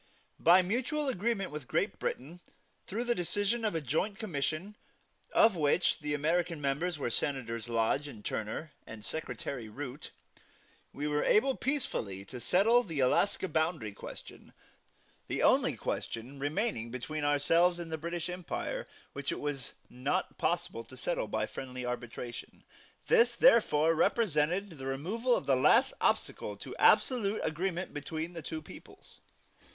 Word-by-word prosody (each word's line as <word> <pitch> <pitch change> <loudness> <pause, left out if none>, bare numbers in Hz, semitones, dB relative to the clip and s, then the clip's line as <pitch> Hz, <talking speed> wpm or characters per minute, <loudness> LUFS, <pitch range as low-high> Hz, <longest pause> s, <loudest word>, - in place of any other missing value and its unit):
By 180 +2 +7
mutual 255 - -1
agreement 215 - -1
with 150 -4 -7
Great - - 0
Britain, 155 +8 -4 0.5
through 220 +5 -2
the 240 -1 +1
decision 205 +5 -1
of 210 -5 0
a 165 - 0
joint 160 - -1
commission, 175 - -3 0.6
of 220 -3 +5
which 160 +2 +2
the 150 -1 -2
American 165 +2 0
members 150 +5 -1
were 130 -4 -2
Senators 115 -4 -2
Lodge 115 +5 +1
and 110 -7 -11
Turner, 110 +9 -3 0.2
and 110 -1 -8
Secretary 140 -6 -4
Root, 140 +4 -7 0.8
we 145 +2 -3
were 150 0 +1
able 265 +6 +4
peacefully 110 - -2
to 125 +5 -8
settle 205 - +4
the 165 - -5
Alaska 165 +9 +2
Boundary 160 - 0
question, 100 - -10 0.7
the - - -1
only - - +4
question 125 +5 -4
remaining 145 - -1
between 145 +5 -4
ourselves 165 +5 +3
and 170 -2 -6
the 160 - -1
British 170 +1 -3
Empire 180 -1 -4 0.3
which 140 0 -3
it - - -3
was 145 -3 -3
not 125 +3 -2
possible - - -1
to - - -13
settle - - -1
by - - -1
friendly 125 -1 -6
arbitration; 120 -1 -6 0.4
this 235 +1 +4
therefore 165 -10 +5
represented 180 0 +2
the 135 - -5
removal 210 - 0
of - - -2
the 135 - +4
last 230 - +5
obstacle - - 0
to - - -8
absolute 220 -5 +4
agreement 180 +3 -2
between 160 +3 -4
the 165 - -6
two 155 +1 -5
peoples. - - -13
160 Hz, 145 wpm, -31 LUFS, 135-195 Hz, 0.8 s, By